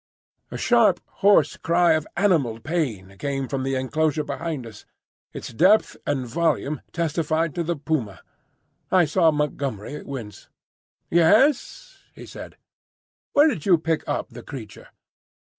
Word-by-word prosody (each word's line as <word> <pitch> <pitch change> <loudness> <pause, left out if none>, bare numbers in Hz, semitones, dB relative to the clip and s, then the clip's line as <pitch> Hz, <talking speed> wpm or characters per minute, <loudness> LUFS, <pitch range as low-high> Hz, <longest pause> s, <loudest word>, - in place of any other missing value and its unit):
A - - -6
sharp, 235 -3 +3 0.2
hoarse 195 -7 +4
cry 170 +1 +3
of 155 -1 -1
animal 160 - +2
pain 115 - -3
came 135 -2 -2
from 135 0 -3
the 135 0 -1
enclosure 150 +3 0
behind 155 -4 -4
us. 110 -2 -12 0.5
Its - - -7
depth 190 - +4
and 135 -3 -1
volume 150 +1 -1
testified 165 -1 -1
to 170 - -2
the 170 +1 -1
puma. 140 - -3 0.7
I 180 -2 +4
saw 165 +2 +3
Montgomery 145 -4 -3
wince. 120 -7 -8 0.6
"Yes?" 235 - +2 0.2
he - - -10
said. - - -10 0.8
"Where 290 +2 +6
did 180 - -2
you 180 -3 +6
pick 160 0 -1
up 145 - -2
the - - -10
creature?" 120 -7 -10
155 Hz, 135 wpm, -23 LUFS, 135-170 Hz, 0.8 s, Where